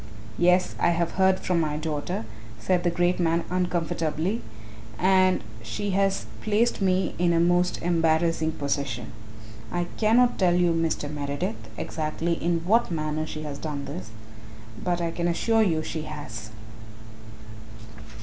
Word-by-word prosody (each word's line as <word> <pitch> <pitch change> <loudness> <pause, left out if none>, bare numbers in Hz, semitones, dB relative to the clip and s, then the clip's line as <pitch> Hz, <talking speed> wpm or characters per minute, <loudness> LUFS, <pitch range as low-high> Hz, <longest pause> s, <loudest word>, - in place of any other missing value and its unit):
"Yes, 180 +1 +4
I - - +3
have 170 -1 0
heard 190 0 +3
from 180 -2 +1
my 150 -2 0
daughter," 155 -2 -3 0.3
said 180 -2 +1
that 175 -1 0
great 175 0 +2
man 170 -1 +2
uncomfortably, 175 +1 -1 0.6
"and 185 - +3
really 110 +1 -15
she 115 - -3
has 195 0 +1 0.2
placed 220 +1 +1
me 185 -1 +2
in 175 -1 +3
a 165 - +3
most 175 +1 +2
embarrassing 165 -1 +2
position. 140 -2 -3 0.6
I 175 0 0
cannot 240 +3 +3
tell 180 -3 +4
you, 175 -1 +3
Mr. 165 -2 0
Meredith, 140 -7 -4
exactly 160 +2 -2
in 170 -1 0
what 230 +6 +3
manner 155 -1 -2
she 155 0 -6
has 145 -2 -6
done 145 -3 -4
this, 110 -7 -6 0.7
but 175 -1 0
I 170 -1 -1
can 170 +1 -1
assure 225 +6 +2
you 165 -7 +2
she 160 - -4
has." 145 -8 -7
170 Hz, 145 wpm, -26 LUFS, 155-180 Hz, 0.7 s, Yes